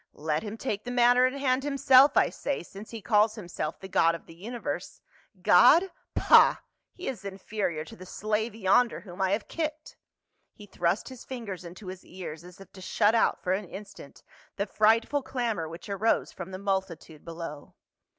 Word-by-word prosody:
Let 150 0 -1
him 215 0 -6
take 215 -4 -3
the 245 - -6
matter 245 +1 +5
in 260 +2 -4
hand 265 -1 +1
himself, 275 -1 +5
I - - +4
say, 285 - -3
since 195 +4 -11
he 225 -3 -8
calls 215 0 +3
him 200 -5 -8
self 155 -2 -4
the 190 - -8
god 165 -3 +3
of 170 - -11
the - - -13
universe. 225 +8 -6 0.4
God? 365 +3 +6 0.2
Pah! - - +6 0.4
He 365 - -9
is 245 -8 -4
inferior 190 -4 -3
to - - -12
the 185 +1 -12
slave 215 +3 -2
yonder 225 +3 +2
whom 180 -1 -9
I 190 - +2
have 205 +2 -1
kicked." 310 -1 -5 0.6
He 210 - -12
thrust 175 0 -1
his 260 -2 -11
fingers 220 -8 -7
into 180 +4 -11
his 185 0 -8
ears 170 -3 -8
as 180 +1 -14
if 195 - -14
to 190 - -12
shut 210 +3 +2
out 230 - +2
for 180 - +1
an 200 +2 -2
instant 195 -6 -11 0.3
the 200 - -1
frightful 225 +7 +2
clamor 230 -11 -2
which 165 +2 -10
arose 205 +3 0
from 175 0 -8
the 185 - -6
multitude 190 -6 -3
below. 165 -3 -8
205 Hz, 190 wpm, -28 LUFS, 180-240 Hz, 0.6 s, God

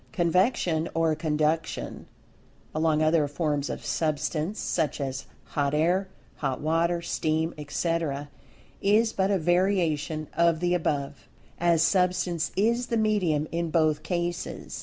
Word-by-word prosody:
Convection 175 -2 +1
or 165 -1 +2
conduction 155 0 -1 0.7
along 155 0 +2
other 155 -1 +3
forms 145 -1 -1
of - - -5
Substance, 155 +4 -1
such 160 -4 -1
as 135 -1 -4 0.2
hot 145 0 -1
air, 175 +5 +2 0.3
hot 135 -3 -2
water 170 +2 +1
steam, 160 0 -1
etc., 150 -1 -2 0.5
is 215 +3 +3
but 190 0 +1
a 200 - +3
variation 165 -3 +1
of 170 0 +3
the 175 +1 +1
above, 145 -5 -2 0.3
as 170 -2 +3
Substance 180 -2 +1
is 235 +5 +1
the 230 - 0
medium 185 -9 +1
in 170 0 -1
both 155 -2 +2
cases. 175 -1 -3
165 Hz, 125 wpm, -27 LUFS, 155-175 Hz, 0.7 s, other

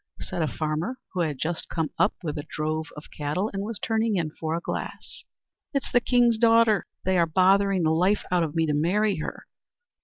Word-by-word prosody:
said 175 - -4
a 155 - +1
farmer, 155 - -2 0.2
who 185 - -3
had 155 -5 0
just 160 +4 -3
come 160 -3 -2
up - - +3
with 150 -3 -3
a 145 - -3
drove 155 +1 -2
of 150 - -11
cattle, 155 +9 -2
and 195 - -2
was 215 +1 -4
turning 225 0 0
in 165 -4 -1
for 160 +1 -3
a - - -1
glass. - - -6 0.5
"It's 275 - -1
the 245 - +4
king's 240 -2 +3
daughter. 230 -3 +4 0.2
They 185 -1 +2
are 170 - +3
bothering 190 +2 +3
the 155 - +3
life 185 +6 +2
out 180 -1 +3
of 160 -1 -2
me 165 0 +2
to 150 - 0
marry 195 +7 +1
her." 155 - -6
175 Hz, 210 wpm, -26 LUFS, 155-210 Hz, 0.5 s, the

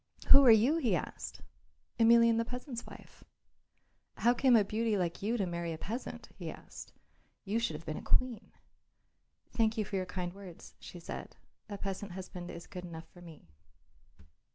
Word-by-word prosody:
"Who 275 - +10
are - - +8
you?" 230 +8 +6
he 240 - +2
asked. 155 - -5 0.6
"Emelian 230 0 +6
the - - +2
peasant's 245 +1 -6
wife." - - -13 0.9
"How 240 +1 +4
came 250 0 +4
a 215 - +6
beauty 215 +1 0
like 175 -2 -2
you 225 +4 0
to 200 - 0
marry 170 -1 -3
a - - -6
peasant?" 225 +10 -6
he - - -6
asked. - - -10 0.5
"You 210 +3 0
should 230 -9 -1
have 160 +2 -9
been 155 - -4
a - - -9
queen." 245 -4 0 1.0
"Thank 225 0 +1
you 215 - 0
for 195 - -3
your 185 -1 -2
kind 180 -2 -4
words," 190 -3 -11
she 175 - -10
said; 170 - -7 0.3
"a 205 - -5
peasant 195 -1 -5
husband 180 -1 -7
is 170 - -8
good 180 -2 -8
enough 165 -2 -8
for 175 - -16
me." 160 - -14
200 Hz, 175 wpm, -32 LUFS, 175-230 Hz, 1.0 s, Who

